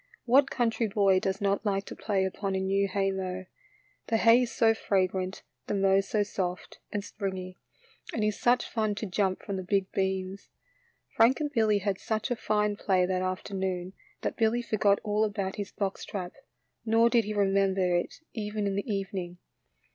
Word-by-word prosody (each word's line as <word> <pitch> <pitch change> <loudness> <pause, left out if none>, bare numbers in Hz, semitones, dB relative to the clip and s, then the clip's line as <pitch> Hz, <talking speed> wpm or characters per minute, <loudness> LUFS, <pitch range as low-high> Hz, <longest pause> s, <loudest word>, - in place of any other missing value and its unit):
What 265 +3 +5
country 230 -1 0
boy 195 -2 +3
does 190 +1 -2
not 200 +1 +1
like 195 -2 0
to - - -8
play 195 -3 0
upon 195 +1 -2
a - - 0
new 195 +1 +1
haymow? 190 -1 -2 0.6
The 225 - +2
hay 230 +2 +6
is 245 - -1
so 225 -1 +4
fragrant, 190 -3 -1 0.2
the - - -1
mow 195 0 +4
so 205 +1 0
soft 185 -3 -4
and 205 -1 -2
springy, 190 -3 -5 0.5
and 220 - -1
it 210 - +3
is 210 - -6
such 245 +1 +3
fun 215 -3 -1
to 215 - -4
jump 190 -1 -1
from 200 -2 -3
the 185 - -4
big 195 +1 0
beams. 190 0 -2 0.7
Frank 235 +4 +5
and 295 -1 -2
Billy 220 -5 +3
had 200 -1 -1
such 220 +3 -2
a - - +2
fine 210 -2 0
play 185 -3 +2
that 185 0 -1
afternoon 185 -1 -3 0.3
that - - -3
Billy 235 +1 +2
forgot 205 -3 +2
all 210 0 +1
about 200 -3 -2
his 205 -1 -4
box 200 -1 -3
trap, 180 -3 -5 0.5
nor 225 +1 +4
did 235 -2 +3
he 215 - -3
remember 195 -2 +2
it 175 - -2
even 210 -1 -3
in 200 - 0
the 200 +3 -2
evening. 190 -3 -3
200 Hz, 185 wpm, -28 LUFS, 190-215 Hz, 0.7 s, hay